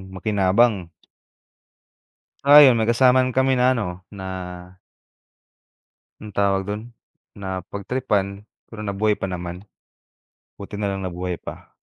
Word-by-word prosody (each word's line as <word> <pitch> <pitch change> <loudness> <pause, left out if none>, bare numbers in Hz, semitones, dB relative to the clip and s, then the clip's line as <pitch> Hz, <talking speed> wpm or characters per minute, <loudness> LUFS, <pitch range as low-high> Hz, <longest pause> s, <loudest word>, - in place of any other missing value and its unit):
makinabang. 100 0 +2 1.6
Ay, 145 -1 +9
'yon, - - 0
may 110 - 0
kasama 125 +2 +5
na 130 -1 -1
kami 130 0 +3
na 130 0 +3
ano 90 -5 -4
na 95 -2 -9 1.9
Anong 105 -2 -11
tawag 100 -1 +2
dun, 105 +1 -3 0.5
napagtripan 100 +2 -3 0.2
pero 115 - -10
nabuhay 105 +1 0
pa - - -6
naman. 90 0 -5 0.9
Buti 100 +1 -9
na 100 -1 -2
lang 95 -1 -4
nabuhay 90 0 -4
pa. - - -10
100 Hz, 115 wpm, -22 LUFS, 95-120 Hz, 1.9 s, Ay